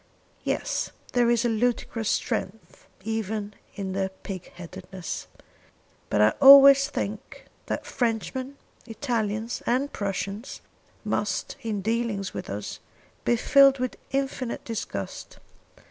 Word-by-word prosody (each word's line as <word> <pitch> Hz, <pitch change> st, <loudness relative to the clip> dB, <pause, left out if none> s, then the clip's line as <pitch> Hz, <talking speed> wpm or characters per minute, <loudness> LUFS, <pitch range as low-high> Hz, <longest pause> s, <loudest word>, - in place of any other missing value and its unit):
"Yes; -, -, -1 dB, 0.2 s
there 240 Hz, -1 st, +3 dB
is 240 Hz, 0 st, +2 dB
a -, -, +4 dB
ludicrous 225 Hz, -1 st, 0 dB
strength 190 Hz, -2 st, -3 dB, 0.2 s
even 215 Hz, -1 st, -3 dB, 0.2 s
in 190 Hz, -2 st, -4 dB
their 190 Hz, 0 st, -1 dB
pig 190 Hz, -1 st, -8 dB
headedness. 180 Hz, 0 st, -7 dB, 0.8 s
But 105 Hz, -, +2 dB
I 105 Hz, -, +7 dB
always 275 Hz, 0 st, +10 dB
think 210 Hz, -6 st, -5 dB, 0.2 s
that -, -, -3 dB
Frenchmen, 255 Hz, +3 st, -2 dB, 0.3 s
Italians, 225 Hz, -2 st, -2 dB
and 265 Hz, +4 st, +1 dB
Prussians 200 Hz, +3 st, -4 dB, 0.4 s
must 205 Hz, -2 st, -1 dB
in 210 Hz, -4 st, -3 dB
dealing 225 Hz, -2 st, -1 dB
with -, -, -6 dB
us, 100 Hz, +1 st, -5 dB, 0.5 s
be 240 Hz, -, +4 dB
filled 275 Hz, +3 st, +6 dB
with 255 Hz, -1 st, -2 dB
infinite 270 Hz, -3 st, -2 dB
disgust. 100 Hz, -, -5 dB
225 Hz, 115 wpm, -26 LUFS, 195-245 Hz, 0.8 s, always